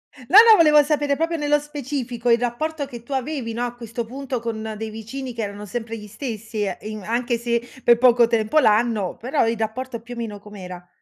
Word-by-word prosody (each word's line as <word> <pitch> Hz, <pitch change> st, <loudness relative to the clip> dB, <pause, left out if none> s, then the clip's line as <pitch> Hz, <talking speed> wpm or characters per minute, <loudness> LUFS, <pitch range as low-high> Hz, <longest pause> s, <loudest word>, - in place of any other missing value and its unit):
dim 255 Hz, -, -14 dB
no, 390 Hz, -, +7 dB
no 440 Hz, -, +10 dB
volevo 300 Hz, -4 st, +6 dB
sapere 290 Hz, -1 st, +1 dB
proprio 330 Hz, +1 st, -1 dB
nello 295 Hz, 0 st, +3 dB
specifico 270 Hz, -5 st, -4 dB
il 235 Hz, -, +6 dB
rapporto 285 Hz, +5 st, -2 dB
che 240 Hz, -3 st, -9 dB
tu 235 Hz, -, -16 dB
avevi, 265 Hz, -3 st, -3 dB
no, 240 Hz, +1 st, -2 dB
a 240 Hz, -, -4 dB
questo 235 Hz, -1 st, -6 dB
punto 260 Hz, +1 st, -4 dB
con 220 Hz, -1 st, -4 dB
dei 220 Hz, 0 st, -5 dB
vicini 245 Hz, +4 st, -6 dB
che 230 Hz, -, -4 dB
erano 205 Hz, 0 st, -5 dB
sempre 225 Hz, +2 st, -5 dB
gli 210 Hz, -, -10 dB
stessi 220 Hz, -1 st, -5 dB
e 190 Hz, -3 st, -3 dB
in 215 Hz, -1 st, -6 dB
anche 235 Hz, +2 st, -1 dB
se 235 Hz, 0 st, 0 dB, 0.2 s
per 235 Hz, -1 st, +6 dB
poco 240 Hz, -1 st, +5 dB
tempo 230 Hz, +5 st, +2 dB
l'anno, 215 Hz, -5 st, +2 dB
però 250 Hz, 0 st, 0 dB
il 230 Hz, -1 st, 0 dB
rapporto 235 Hz, +2 st, -3 dB
più 245 Hz, +2 st, -10 dB
o -, -, -9 dB
meno 215 Hz, -3 st, -5 dB
com'era? 185 Hz, -4 st, -10 dB
235 Hz, 220 wpm, -22 LUFS, 220-270 Hz, 0.2 s, no